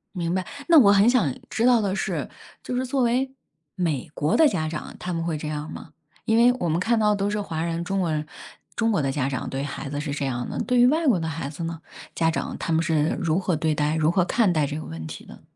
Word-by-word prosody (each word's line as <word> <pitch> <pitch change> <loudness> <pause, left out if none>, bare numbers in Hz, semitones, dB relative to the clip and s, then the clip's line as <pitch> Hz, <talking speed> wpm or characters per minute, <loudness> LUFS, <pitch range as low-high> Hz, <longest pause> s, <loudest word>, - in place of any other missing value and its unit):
明 170 -1 -1
白， 185 0 -1 0.2
那 335 -2 +8
我 205 -7 +7
很 200 +2 +5
想 235 - +3 0.2
知 230 - +1
道 245 -2 +5
的 195 -3 -1
是 195 - -2 0.3
就 - - -5
是 255 - 0
作 260 +1 0
为 250 +3 +1 0.4
美 160 -8 -2
国 150 +2 +1
的 320 -2 +6
家 155 - -1
长， 155 -1 -6
他 180 - -4
们 165 -1 -2
会 165 -2 -1
这 150 0 -5
样 150 +1 -4
吗？ - - -9 0.3
因 225 - +2
为 240 +2 +6
我 175 - 0
们 160 +1 +1
看 230 +5 +2
到 210 -1 +3
都 200 0 -1
是 210 0 -1
华 165 -5 -3
人 170 0 -2
中 195 +2 -1
国 175 -3 0
人， 155 -1 -2 0.5
中 225 +1 +1
国 200 -7 +1
的 135 -2 0
家 135 -2 -1
长 130 -2 -3
对 135 +1 -3
孩 140 0 -5
子 145 +1 -3
是 145 -1 -3
这 140 -1 -2
样 125 -2 -3
的。 - - -4
对 250 0 +1
于 245 - +7
外 315 +4 +1
国 235 -9 +4
的 160 - -2
孩 145 -3 -4
子 155 +3 -7
呢， 165 -1 -5 0.3
家 165 -1 +2
长 165 - -3
他 165 - -2
们 160 +1 +3
是 160 -2 +1
如 165 0 +1
何 185 -2 0
对 155 0 0
待， 150 +1 0
如 155 0 +2
何 180 0 +2
看 205 0 +2
待 155 -3 +1
这 145 +1 -4
个 155 - -6
问 80 0 -7
题 80 +1 -8
的？ - - -14
170 Hz, 295 characters per minute, -24 LUFS, 150-210 Hz, 0.5 s, 那